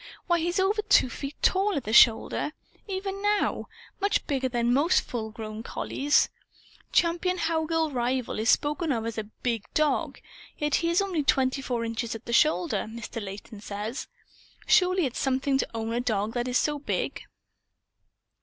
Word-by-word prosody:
Why, 345 -1 +2
he's 345 +3 0
over 405 +3 +2
two 410 -11 +4
feet 275 +1 -6
tall, 390 +1 +3
at 280 - -2
the 215 - -4
shoulder, 235 +6 +5 0.3
even 390 0 -4
now 415 0 0 0.3
much 405 +1 +1
bigger 265 -2 -1
than 240 -1 +1
most 295 +7 +3
full 225 -3 -5
grown 215 0 -7
collies. 280 +5 +1 0.6
Champion 350 +2 +2
Howgill 325 -1 0
Rival 250 -2 -1
is 220 +1 +1
spoken 300 +2 +2
of 225 -4 -1
as 230 -1 -3
a 215 - -4
'big' 225 0 -4
dog; 305 -1 +1 0.4
yet 295 -1 -1
he 335 - +1
is 340 +4 +3
only 365 -6 -1
twenty 265 -1 +1
four 240 -3 -2
inches 230 0 -3
at 225 - -9
the 235 - -4
shoulder, 310 +3 +2
Mr. 230 -1 -6
Leighton 200 +2 -9
says. 210 +4 -5 0.6
Surely 365 -1 +4
it's 255 - -3
something 270 0 +1
to - - 0
own 225 0 -2
a 240 - 0
dog 220 -3 -1
that 240 +1 -1
is 250 0 +2
so 295 -1 0
big." 285 - -2
270 Hz, 170 wpm, -27 LUFS, 230-335 Hz, 0.6 s, shoulder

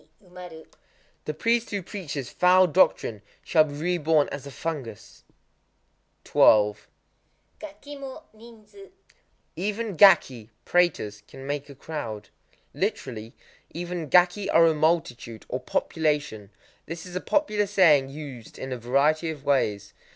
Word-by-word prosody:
_ 180 -3 -12 0.6
The 155 - -3
priest 230 +7 0
who 200 -2 -3
preaches 150 -9 -6
foul 185 +1 +5
doctrine 150 - +2 0.2
shall 155 -2 +4
be 145 -2 -8
reborn 160 -2 +1
as 140 0 -7
a - - -7
fungus. 135 -6 -7 1.0
12.—Gaki 195 - -1
mo 275 +3 -9
ninzu. 230 - -16 0.7
Even 210 +2 -3
gaki 130 - +5 0.2
(prêtas) 140 -13 +1
can 135 0 -12
make 145 +1 -4
a 140 - -11
crowd. 115 -8 -7 0.4
Literally: 125 - -4 0.4
"Even 175 -2 -5
gaki 180 +3 +3
are 165 - +5
a 165 - +4
multitude 150 -8 -1
(or, 130 - -3
'population')." 145 -6 -2 0.4
This 165 +1 -7
is 180 -1 -10
a 180 - -2
popular 210 -9 0
saying 160 -9 +4
used 135 -5 -10
in 135 - -7
a 125 - -3
variety 145 +7 +1
of 150 -3 -7
ways. 105 -7 0
160 Hz, 125 wpm, -25 LUFS, 135-185 Hz, 1.0 s, foul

